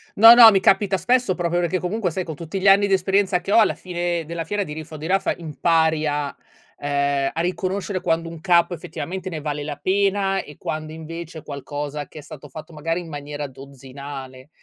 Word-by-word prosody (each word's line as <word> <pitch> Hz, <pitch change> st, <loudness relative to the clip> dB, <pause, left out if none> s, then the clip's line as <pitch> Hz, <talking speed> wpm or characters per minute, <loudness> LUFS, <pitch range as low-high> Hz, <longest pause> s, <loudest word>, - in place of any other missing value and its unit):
No, 225 Hz, +3 st, +10 dB
no, 235 Hz, -2 st, +10 dB
mi 195 Hz, -, +3 dB
capita 195 Hz, 0 st, +3 dB
spesso 240 Hz, +1 st, +1 dB
proprio 175 Hz, 0 st, 0 dB
perché 175 Hz, +1 st, 0 dB
comunque 180 Hz, +1 st, -2 dB
sai 185 Hz, +3 st, -3 dB
con 160 Hz, -, -6 dB
tutti 170 Hz, +5 st, -5 dB
gli 195 Hz, -, +1 dB
anni 200 Hz, +1 st, +6 dB
di 195 Hz, -, +1 dB
esperienza 190 Hz, 0 st, +2 dB
che 195 Hz, +3 st, -3 dB
ho, -, -, +7 dB
alla 215 Hz, -, +3 dB
fine 175 Hz, -2 st, -3 dB
della 165 Hz, +1 st, -4 dB
fiera, 205 Hz, +5 st, -2 dB
di 150 Hz, -, -7 dB
riffa 155 Hz, 0 st, -8 dB
o -, -, -6 dB
di 155 Hz, +2 st, -6 dB
raffa, 195 Hz, +2 st, +1 dB
impari 160 Hz, -1 st, +1 dB
a 145 Hz, -1 st, -2 dB, 0.4 s
ehm, 140 Hz, -1 st, 0 dB
a -, -, -4 dB
riconoscere 185 Hz, +2 st, -2 dB
quando 165 Hz, -1 st, 0 dB
un 165 Hz, -1 st, -9 dB
capo 175 Hz, -1 st, +3 dB
effettivamente 180 Hz, +2 st, -6 dB
ne 165 Hz, -3 st, -5 dB
vale 145 Hz, -1 st, -4 dB
la 145 Hz, -1 st, -5 dB
pena 195 Hz, +3 st, +1 dB
e 150 Hz, -, -13 dB
quando 155 Hz, 0 st, -5 dB
invece 160 Hz, +1 st, -8 dB
è -, -, -15 dB
qualcosa 145 Hz, +1 st, -5 dB
che 155 Hz, -, -11 dB
è -, -, -9 dB
stato 150 Hz, 0 st, -11 dB
fatto 155 Hz, +4 st, -10 dB
magari 165 Hz, +3 st, -2 dB
in 175 Hz, -, -8 dB
maniera 145 Hz, -1 st, -6 dB
dozzinale. 135 Hz, 0 st, -10 dB
165 Hz, 215 wpm, -22 LUFS, 150-185 Hz, 0.4 s, No